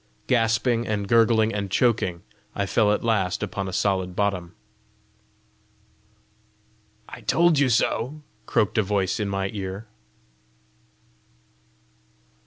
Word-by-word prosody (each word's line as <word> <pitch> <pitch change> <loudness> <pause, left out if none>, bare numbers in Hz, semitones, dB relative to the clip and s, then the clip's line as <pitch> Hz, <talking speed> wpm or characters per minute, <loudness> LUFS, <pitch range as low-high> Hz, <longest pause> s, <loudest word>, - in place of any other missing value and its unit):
Gasping 115 0 +1
and 105 -2 -2
gurgling 115 0 +3
and 100 -1 -3
choking, 95 -5 +1 0.3
I 100 - -1
fell 105 +1 +2
at 105 - 0
last 100 -6 0
upon 95 - -4
a - - -4
solid 95 -1 -1
bottom. 95 -4 -2 2.5
"I - - -10
told 170 -3 +3
you 140 -2 +3
so!" 130 +5 0 0.2
croaked 110 +1 +1
a - - +5
voice 100 0 -1
in 105 -1 -1
my 95 0 -2
ear. 95 +1 -5
105 Hz, 110 wpm, -24 LUFS, 95-115 Hz, 2.5 s, a